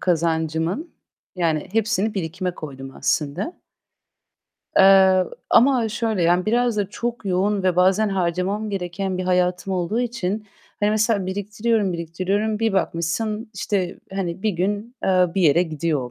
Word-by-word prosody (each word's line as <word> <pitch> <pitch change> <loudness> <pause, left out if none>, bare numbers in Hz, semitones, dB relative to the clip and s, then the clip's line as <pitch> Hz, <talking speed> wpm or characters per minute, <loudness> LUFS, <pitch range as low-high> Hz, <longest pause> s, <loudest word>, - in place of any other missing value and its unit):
kazancımın 165 - 0 0.5
yani 160 -4 0
hepsini 220 -1 +1
birikime 180 0 -3
koydum 135 -3 -9
aslında. 160 - -1 1.2
Eee, 190 -1 +6 0.3
ama 240 -1 +4
şöyle 220 -3 -1
yani 175 +3 +2
biraz 240 0 +2
da 200 -2 0
çok 235 -1 -4
yoğun 195 +2 +1
ve 185 -2 +1
bazen 190 +4 +4
harcamam 195 +3 -1
gereken 185 0 -3
bir 185 - -2
hayatım 180 +1 +1
olduğu 185 +5 -1
için 215 -4 -3 0.3
hani 205 0 +3
mesela 215 -3 +1
biriktiriyorum, 205 +1 -1
biriktiriyorum 185 +6 -1
bir 225 -1 +1
bakmışsın 195 +5 -1
işte 185 -4 -2
hani 185 -2 -3
bir 220 - +2
gün, 205 +6 -2
eee, 185 -1 +4
bir 190 - +1
yere 165 +2 +5
gidiyor 155 -2 -1
o 125 - -7
190 Hz, 140 wpm, -22 LUFS, 175-215 Hz, 1.2 s, Eee